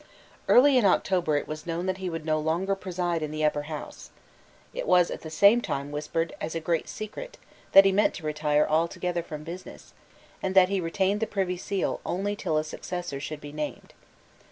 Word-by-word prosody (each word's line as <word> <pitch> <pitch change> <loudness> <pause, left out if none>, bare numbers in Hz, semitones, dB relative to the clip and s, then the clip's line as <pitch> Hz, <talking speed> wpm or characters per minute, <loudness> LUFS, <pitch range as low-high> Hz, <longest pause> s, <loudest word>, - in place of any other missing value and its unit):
Early 260 +1 +7
in - - +1
October 180 -5 +2
it - - -3
was 155 +2 -7
known 170 +1 -2
that 185 0 -2
he 185 -1 -3
would 165 -2 -5
no 155 -1 +1
longer 170 +6 0
preside 180 -3 -2
in 155 - -2
the 155 0 -1
Upper 150 -1 +1
House. 155 -2 -7 0.6
It - - -4
was 180 -1 +4
at - - -6
the 160 - -7
same 200 +8 +5
time 140 -8 -3
whispered 155 +2 -2
as 160 +1 -4
a - - 0
great 165 0 -1
secret - - -7 0.4
that 195 0 +10
he 195 - +5
meant 205 +2 +2
to 165 - -8
retire 150 0 +2
altogether 170 +2 0
from 155 -2 -8
business, 175 +3 -10 0.5
and 190 0 -2
that 185 -1 +7
he 195 -1 0
retained 190 +4 0
the 225 - -1
Privy 190 -2 -1
Seal 190 +2 -2
only 200 +3 -2
till 160 -6 -1
a 155 - +1
successor 175 -2 -5
should 145 +1 -6
be 145 - -8
named. 150 0 -6
170 Hz, 205 wpm, -27 LUFS, 155-190 Hz, 0.6 s, that